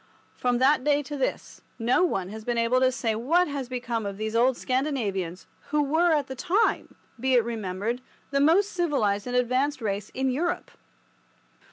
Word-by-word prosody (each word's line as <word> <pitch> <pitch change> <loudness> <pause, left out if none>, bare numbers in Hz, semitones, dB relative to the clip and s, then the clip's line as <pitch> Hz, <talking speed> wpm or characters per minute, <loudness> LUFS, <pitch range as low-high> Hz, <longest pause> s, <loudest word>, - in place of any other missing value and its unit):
From 245 -1 0
that 265 +2 +3
day 290 0 +2
to 290 +2 -6
this 270 - -3 0.2
no 245 +9 +2
one 195 - 0
has 220 +1 -8
been 240 +1 -1
able 230 +2 +3
to 260 0 +3
say 235 -3 -1
what 315 +12 +2
has 280 -4 -4
become 240 -3 -3
of 200 -1 -5
these 220 +1 -3
old 245 +2 +3
Scandinavians, 215 - -2 0.2
who 300 0 +2
were 320 +5 +2
at 295 -3 +2
the 265 - -6
time, 370 - 0 0.2
be 260 +1 +2
it 240 - +5
remembered, 220 +1 -3 0.3
the 275 - +2
most 370 +8 +4
civilized 250 - 0
and 245 - -2
advanced 255 +4 +1
race 205 -3 -3
in 265 0 0
Europe. 340 +7 -2
255 Hz, 180 wpm, -26 LUFS, 225-290 Hz, 0.3 s, it